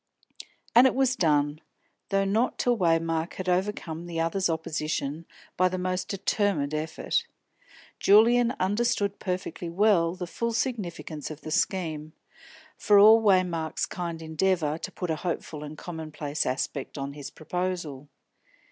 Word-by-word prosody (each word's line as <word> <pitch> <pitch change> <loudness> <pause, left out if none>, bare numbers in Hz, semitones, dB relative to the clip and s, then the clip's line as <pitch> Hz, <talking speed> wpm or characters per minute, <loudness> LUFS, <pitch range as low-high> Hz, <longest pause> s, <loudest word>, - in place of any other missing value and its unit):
_" - - -9 0.3
And 245 +3 +8
it 260 - 0
was 260 -1 +2
done, 150 - +1 0.5
though 195 0 +2
not 220 +6 +1
till 245 -1 +2
Waymark 165 -3 +1
had 185 - -5
overcome 180 -3 -1
the 165 -1 -4
other's 175 +3 0
opposition 155 -1 -3 0.3
by 185 0 +3
the 185 - -3
most 185 0 -2
determined 195 -7 0
effort. 155 +2 -1 0.7
Julian 235 +4 +5
understood 205 0 0
perfectly 180 -2 -4
well 175 -2 +3
the 180 - -5
full 235 +6 -3
significance 185 - -3
of 155 -1 -8
the 155 - -7
scheme, 155 -4 -1 0.7
for 205 - +5
all 220 +3 +8
Waymark's 180 -6 +1
kind 170 -2 -5
endeavour 160 -1 0
to - - -6
put 180 -3 -4
a 160 - -1
hopeful 160 -3 -4
and 150 +1 -8
commonplace 155 -3 -4
aspect 135 +2 -3
on 140 0 -4
his 140 -1 -7
proposal. 165 -5 -4
175 Hz, 140 wpm, -27 LUFS, 155-195 Hz, 0.7 s, And